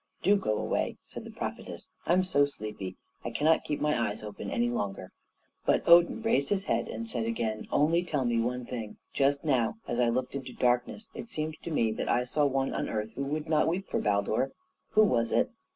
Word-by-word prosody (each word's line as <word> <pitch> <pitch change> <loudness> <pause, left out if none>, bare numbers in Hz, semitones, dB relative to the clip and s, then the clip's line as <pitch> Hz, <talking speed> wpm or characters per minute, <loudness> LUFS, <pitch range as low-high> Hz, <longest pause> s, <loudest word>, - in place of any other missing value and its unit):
"Do 200 +2 +5
go 110 - 0
away," - - -1
said - - -9
the - - -8
prophetess, - - -6 0.2
"I'm 180 +2 +4
so 145 -6 +3
sleepy; 105 -8 -6 0.3
I - - -2
cannot 160 +2 +2
keep 150 - -2
my 150 -7 +1
eyes 105 - -6
open 105 -1 -6
any 120 +3 +1
longer." 100 -5 -3 0.5
But - - +2
Odin 175 +6 +6
raised 225 -11 +2
his 195 -2 +1
head 115 - 0
and 115 +1 -5
said 115 -1 -2
again, 115 -1 -2
"Only 165 +4 +3
tell 150 -7 -1
me 120 -1 +2
one 125 +2 -1
thing. 115 -4 -6 0.2
Just 140 +1 +2
now, 135 - +1
as 120 - -1
I 120 -1 +4
looked 125 +2 -1
into 135 -2 -5
darkness, 125 - 0
it 230 - -7
seemed 155 -4 -3
to - - -6
me 115 -8 +1
that 110 - -3
I 125 - +3
saw 145 +4 +1
one 135 0 0
on - - -2
earth 110 0 -2
who 140 - -5
would 150 +3 -3
not 155 -1 +3
weep 180 +4 -1
for - - 0
Baldur. 105 +5 +1 0.4
Who 215 - +7
was 115 - +2
it?" - - +2
130 Hz, 215 wpm, -29 LUFS, 115-155 Hz, 0.5 s, Who